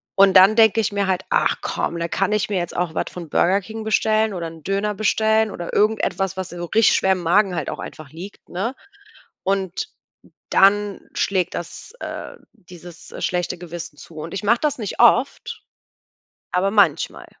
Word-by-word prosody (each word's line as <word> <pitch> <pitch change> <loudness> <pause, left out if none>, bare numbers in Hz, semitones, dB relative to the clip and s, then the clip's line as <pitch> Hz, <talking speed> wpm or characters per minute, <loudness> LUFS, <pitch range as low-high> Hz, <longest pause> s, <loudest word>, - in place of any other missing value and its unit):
Und 195 -1 +6
dann 190 +3 +7
denke 225 -1 +5
ich 210 - -1
mir 200 -1 0
halt: 185 -1 0
„Ach - - +2
komm, 170 - -2
da 170 - -1
kann 195 +3 0
ich 210 0 0
mir 200 - -1
jetzt 175 -1 -3
auch 175 -2 -1
was - - 0
von 170 -3 -8
Burger 190 +6 +2
King 220 +3 -8
bestellen 220 0 +1
oder 170 -3 -4
'n 160 -1 -12
Döner 200 +2 -1
bestellen 220 +1 +2
oder 175 -2 -7
irgendetwas, 200 -3 +1
was 185 -1 -4
so 175 0 -6
richtig 220 +5 +4
schwer 190 - +2
im 185 - -4
Magen 190 +3 +3
halt 155 -4 -3
auch - - -6
einfach 155 -3 -9
liegt,“ 180 +6 -11
ne? 200 +9 -3 0.7
Und 195 - -2 0.6
dann 205 +1 +3
schlägt 185 -3 0
das, 175 - -7
äh - - -7 0.2
dieses 175 0 -14
schlechte 180 0 -1
Gewissen 170 -3 -8
zu 165 - -14
und 155 +2 -7
ich 195 +1 -4
mache 230 +3 +3
das 295 -3 0
nicht 210 -4 -5
oft, 245 +3 +2 0.9
aber 185 +2 +1
manchmal. 190 -7 +2
195 Hz, 185 wpm, -21 LUFS, 175-215 Hz, 0.9 s, dann